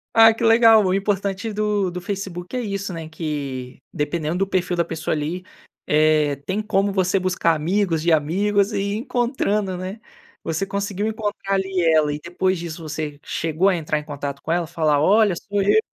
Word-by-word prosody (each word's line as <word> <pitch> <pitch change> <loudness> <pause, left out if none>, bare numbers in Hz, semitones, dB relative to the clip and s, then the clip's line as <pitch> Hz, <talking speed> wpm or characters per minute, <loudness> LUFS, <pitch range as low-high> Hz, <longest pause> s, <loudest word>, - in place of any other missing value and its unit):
Ah, 225 0 +8
que 230 - -5
legal. 225 -2 +6
O 185 - +2
importante 200 +1 -1
do 210 -2 0
do 180 0 -6
Facebook 185 0 -5
é - - 0
isso, 200 -3 -3
né. 165 -2 -6
Que 140 -5 -5
dependendo 155 +3 -2
do 195 - +1
perfil 185 -2 0
da 170 - +2
pessoa, 160 -1 -3
ali, 160 +5 -3 0.4
eh, 150 -1 +3
tem 200 +3 -1
como 200 -2 +1
você 190 0 +1
buscar 180 -3 +1
amigos 170 +1 0
de 170 0 +1
amigos 200 +7 +2
e 200 - 0
ir 200 +1 -1
encontrando, 220 -6 -1
né. 190 +5 -6 0.4
Você 165 +4 -2
conseguiu 200 +1 -2
encontrar, 205 -2 -3
ali, 190 -1 0
ela. 150 -1 +3
E 150 - -5
depois 180 +1 -1
disso 170 -1 -6
você 150 -1 -5
chegou 165 +4 0
a 185 - +2
entrar 150 -2 -1
em - - -9
contato 140 -2 -6
com 160 - -4
ela, 170 -1 0
falar: 155 -3 +1
"Olha, 205 +2 +4
sou 200 +3 -2
eu"? 205 +2 +4
185 Hz, 190 wpm, -22 LUFS, 160-200 Hz, 0.4 s, Ah